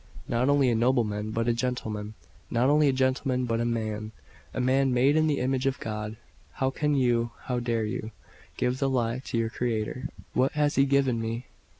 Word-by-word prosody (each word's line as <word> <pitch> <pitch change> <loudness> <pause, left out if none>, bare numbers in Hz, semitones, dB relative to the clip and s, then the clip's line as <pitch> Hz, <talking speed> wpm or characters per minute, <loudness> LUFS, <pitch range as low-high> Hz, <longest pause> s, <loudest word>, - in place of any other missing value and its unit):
Not 125 +3 +1
only 140 -2 +4
a - - +2
nobleman, 110 -3 +1
but 115 +2 -1
a 120 - +3
gentleman; 110 -4 -3 0.3
not 125 +4 +2
only 150 0 +5
a - - +5
gentleman, 130 -1 +1
but 115 -1 0
a - - 0
man 110 -2 -2 0.4
man, 130 +1 +2
made 130 +4 +4
in 155 0 +3
the 145 -2 +1
image 130 +1 0
of 135 - -1
God. 105 0 -4 0.4
How 130 0 0
can 150 +2 0
you, 120 -3 +2
how 125 -1 -1
dare 115 -2 0
you, 110 0 -4 0.5
give 125 +1 0
the 135 - +1
lie 120 -2 0
to - - -2
your 115 -1 0
Creator?" 120 +3 -2 0.2
"What 130 +2 +2
has 150 -1 +2
He 135 - +4
given 135 -4 +2
me? 115 +2 -3
125 Hz, 195 wpm, -27 LUFS, 115-135 Hz, 0.5 s, only